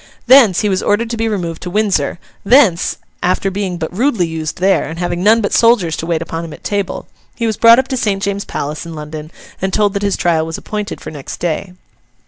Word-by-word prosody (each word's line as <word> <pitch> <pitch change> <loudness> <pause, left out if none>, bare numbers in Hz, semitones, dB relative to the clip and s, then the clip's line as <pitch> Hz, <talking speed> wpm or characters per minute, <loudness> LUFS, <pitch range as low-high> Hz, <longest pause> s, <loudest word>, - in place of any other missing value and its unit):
Thence, 250 -9 +6
he 210 - +1
was 190 -2 0
ordered 225 +3 0
to - - -1
be 225 0 -1
removed 175 -6 -3
to 180 - -5
Windsor; 195 -7 0 0.3
thence, 210 -7 +4 0.2
after 185 +2 0
being 190 -2 -3
but 170 +1 -5
rudely 230 -5 +1
used 160 -2 -4
there, 190 +2 +2
and 160 +3 -7
having 175 0 -2
none 220 +3 +5
but 200 - -2
soldiers 225 -9 +3
to 165 - -5
wait 165 -1 0
upon 165 0 -5
him 165 -2 -8
at - - -13
table, 200 -2 -3 0.3
he 235 - -2
was 220 -1 0
brought 230 +2 +7
up 260 0 +1
to 260 - -1
St. 200 -4 -1
James's 200 0 -2
Palace 150 +2 -4
in 165 -1 -8
London, 150 0 -7 0.3
and 190 +1 -1
told 205 0 +1
that 200 - -2
his 200 -1 0
trial 165 -2 +1
was 165 0 -5
appointed 210 0 -5
for - - -7
next 145 -3 -8
day. 180 +2 -3
190 Hz, 230 wpm, -16 LUFS, 165-215 Hz, 0.3 s, brought